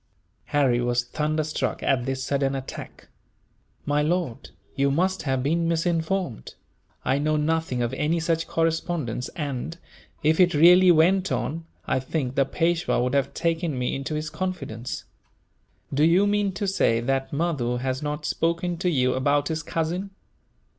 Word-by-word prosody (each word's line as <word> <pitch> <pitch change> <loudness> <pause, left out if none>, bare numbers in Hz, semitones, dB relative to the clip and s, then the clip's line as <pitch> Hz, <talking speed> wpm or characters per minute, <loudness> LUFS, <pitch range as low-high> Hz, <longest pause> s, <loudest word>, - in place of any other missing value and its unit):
Harry 130 -4 +2
was 120 0 +1
thunderstruck 155 +3 -2
at 125 -2 +1
this 135 0 -2
sudden 135 0 0
attack. 135 -1 -8 0.8
"My 145 +1 +1
lord, 160 -5 -1 0.3
you 140 0 +2
must 185 +6 +1
have 130 -1 0
been 165 +4 +1
misinformed. 165 - -1 0.5
I 135 +2 +2
know 155 +1 +1
nothing 150 -5 0
of 120 +2 -2
any 150 +5 0
such 165 0 0
correspondence 165 -7 -1
and, 145 +1 -4 0.5
if 155 +3 +3
it 180 -3 +5
really 180 +4 +7
went 180 +3 +4
on, 165 +3 -2 0.2
I - - +1
think 130 -1 -2
the 135 0 +2
Peishwa 170 +4 0
would 125 +1 0
have 140 -1 0
taken 165 -3 -1
me 125 0 -1
into 135 +3 -3
his 155 0 -3
confidence." 170 -11 -4 0.9
"Do 145 +2 +2
you 175 +5 +5
mean 205 -1 +1
to 200 +2 -3
say 115 -11 +2
that 135 +2 -1
Mahdoo 140 -6 -1
has 130 +1 -2
not 150 0 -3
spoken 170 +1 0
to 180 +1 0
you 130 -6 +2
about 145 +2 +1
his 160 0 -2
cousin?" 170 +5 -2
155 Hz, 155 wpm, -25 LUFS, 135-170 Hz, 0.9 s, really